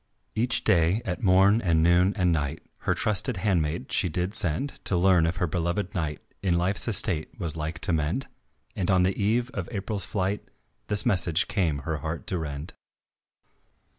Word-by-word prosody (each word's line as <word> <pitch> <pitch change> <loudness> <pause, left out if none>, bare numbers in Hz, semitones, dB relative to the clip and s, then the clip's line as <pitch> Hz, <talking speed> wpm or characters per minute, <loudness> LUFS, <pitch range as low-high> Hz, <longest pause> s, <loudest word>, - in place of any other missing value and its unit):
Each 120 +3 0
day 95 +2 +2
at 90 -4 -3
morn 100 +3 +4
and 80 -5 +2
noon 90 +3 +4
and 90 -3 +2
night 75 -1 -2 0.2
Her - - +3
trusted 110 +2 +1
handmaid 85 -7 -1
she 90 - +1
did 90 +4 -2
send 110 - +1
To 90 - +1
learn 90 -2 +4
if 85 - -2
her 90 - -1
belovèd 85 +4 -2
knight 75 -4 -3 0.2
In 90 -3 +1
life's 95 +6 +1
estate 95 -5 +1
was 85 -4 -2
like 80 +1 -4
to 90 - +2
mend, 80 - -1 0.5
And 90 -1 -2
on 95 -1 +4
the 95 +1 +1
eve 115 +5 0
of 100 -7 -5
April's 100 -1 -3
flight 95 +1 -3 0.4
This 105 -1 +1
message 90 -1 +3
came 80 - -1
her 80 -1 -2
heart 80 +3 -5
to 90 - 0
rend. 75 +2 -5
90 Hz, 175 wpm, -26 LUFS, 80-100 Hz, 0.5 s, morn